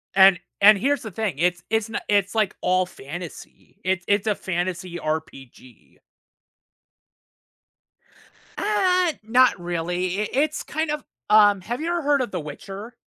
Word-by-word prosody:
And 190 -2 +7 0.2
and 210 +1 +8
here's 280 +8 0
the 220 - -7
thing, 205 -3 -2
it's 175 +2 +1
it's 220 0 0
n 225 - -3
it's, 200 -2 +2
like, 215 -4 0
all 185 0 +2
fantasy, 175 0 -10
it's 185 -1 0
it's 205 0 +2
a 210 - +3
fantasy 180 -1 -3
RPG. 135 -6 -7 2.6
Uh, 365 -5 +2
not 245 0 +4
really, 175 +2 -2
it 210 - -1
it's 295 +4 0
kind 315 +1 -3
of, 300 -2 -3 0.3
um 205 -2 +6
have 235 +7 -4
you 330 - -2
ever 345 0 0
heard 285 -2 +2
of 245 - -3
"The 180 - -3
Witcher"? 195 +10 -9
200 Hz, 145 wpm, -23 LUFS, 175-245 Hz, 2.6 s, and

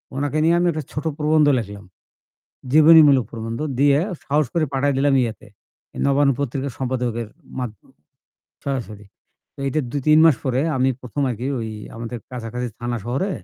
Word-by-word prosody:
উনাকে 145 +2 -1
নিয়ে 165 +2 +4
আমি 175 - +2
একটা 155 -1 -4
ছোট 150 +3 -5
প্রবন্ধ 150 0 +3
লেখলাম। 100 -3 -8 0.9
জীবনীমূলক 155 -5 +7
প্রবন্ধ 115 0 -5 0.2
দিয়ে 140 0 +5 0.3
সাহস 150 +2 +1
করে 165 -2 +1
পাঠায় 140 +1 +1
দিলাম 140 0 +3
ইয়াতে। 115 -3 -4 0.5
এই - - -6
'নবান্ন' 140 -1 +3
পত্রিকার 140 0 -2
সম্পাদকের 125 -3 -2 0.3
মাদ 125 -4 -3 0.9
সরাসরি। 110 -7 -4 0.5
তো - - -42
এইটা 135 +3 0
২-৩ 150 +3 +3
মাস 155 -6 +5
পরে 130 -1 0 0.2
আমি 130 +1 +2
১ম 130 +3 -3
আরকি 120 +2 -4
ওই 115 -1 -4 0.3
আমাদের 115 +1 -6
কাছাকাছি 125 0 -5
থানা 120 0 -3
শহরে 135 - -1
135 Hz, 150 wpm, -21 LUFS, 120-145 Hz, 0.9 s, জীবনীমূলক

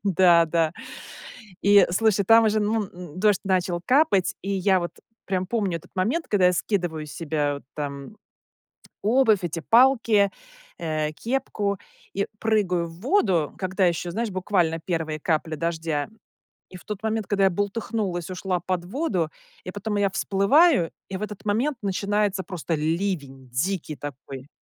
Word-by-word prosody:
Да, 175 -3 +5
да. 160 -1 +1 0.9
И 200 -1 +6
слушай, 205 +1 +2
там 225 +3 +6
уже, 215 0 +2
ну, 210 +1 0
н 180 -2 -10
дождь 205 -2 +3
начал 185 -2 0
капать. 255 - +3
И 195 - -4
я 190 -1 +2
вот 175 - -4 0.3
прям 185 -1 -1
помню 200 -4 -1
этот - - -20
момент, 230 - 0
когда 195 -4 +3
я 180 - +4
скидываю 175 -5 -2
с 145 - -10
себя 150 -3 -1
вот 140 - -8
там 140 +5 -6 0.9
обувь, 220 -2 +4
эти 165 -1 -3
палки, 230 -2 +4 0.5
э, 155 -2 -2
кепку 210 -2 -2 0.4
и 200 +1 0
прыгаю 195 -6 +1
в 165 +1 -12
воду, 195 - +2
когда 190 0 +1
ещё, 175 0 -1
знаешь, 225 +3 -2
буквально 185 -3 0
первые 160 -3 -2
капли 160 0 -1
дождя. 160 -2 -2 0.6
И - - -13
в - - -16
тот 210 -2 -5
момент, 220 -1 -1
когда 195 -1 +2
я - - +5
бултыхнулась, 200 -2 -2
ушла 185 0 -2
под 180 -1 -2
воду, 190 - -1 0.3
и 180 - -6
потом 205 +2 -3
я 200 -1 +2
всплываю, 200 - +3 0.2
и 190 - -4
в - - -10
этот 210 0 -6
момент 235 +7 0
начинается 200 0 0
просто 175 -3 -3
ливень 155 -5 -2
дикий 155 +5 -2
такой. 135 -1 -8
185 Hz, 155 wpm, -24 LUFS, 165-210 Hz, 0.9 s, И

